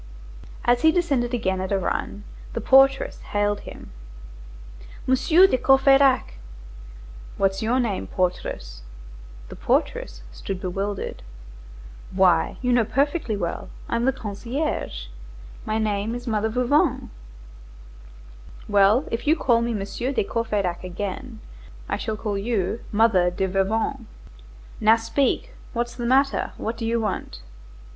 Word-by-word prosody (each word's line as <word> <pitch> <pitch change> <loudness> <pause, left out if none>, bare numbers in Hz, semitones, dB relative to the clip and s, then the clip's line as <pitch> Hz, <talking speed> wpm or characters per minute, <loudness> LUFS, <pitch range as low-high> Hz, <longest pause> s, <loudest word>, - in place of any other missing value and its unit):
As 240 0 +3
he 320 - +6
descended 285 -9 0
again 190 -6 -1
at 190 - -4
a 200 - +2
run, 200 +2 -3 0.3
the - - -2
portress 270 +3 +4
hailed 205 0 -1
him:— - - -12 1.1
"Monsieur 310 +8 +5
de 255 -9 +2
Courfeyrac!" 270 - +4 1.0
"What's 195 0 +1
your 235 +4 +1
name, 220 -6 -1
portress?" - - -3 0.7
The - - -9
portress - - -1
stood 185 - -6
bewildered. 195 +2 -4 0.9
"Why, 185 -1 +2
you 250 0 +2
know 240 -1 +4
perfectly 275 -1 0
well, 170 -3 -4 0.2
I'm 235 +1 0
the 265 - +4
concierge; 235 - -4 0.6
my 215 - 0
name 215 +1 -1
is 245 0 -7
Mother 220 -2 0
Veuvain." 250 +6 +1 1.6
"Well, 205 +5 +4
if 230 +5 -3
you 310 - +5
call 240 -7 +2
me 235 -1 -1
Monsieur 205 +6 -3
de 270 - +1
Courfeyrac 200 -5 -2
again, 205 +6 -6 0.5
I - - -1
shall 220 -1 -3
call 205 -2 -3
you 215 0 -1
Mother 205 -5 +4
de 190 +2 -2
Veuvain. 220 +6 -1 0.7
Now 220 +1 +6
speak, 265 - -1 0.2
what's 240 0 -2
the 240 -1 -4
matter? 275 +2 +2
What 225 - -3
do 225 0 -4
you 230 +1 +1
want?" 185 - -4
225 Hz, 130 wpm, -24 LUFS, 195-250 Hz, 1.6 s, he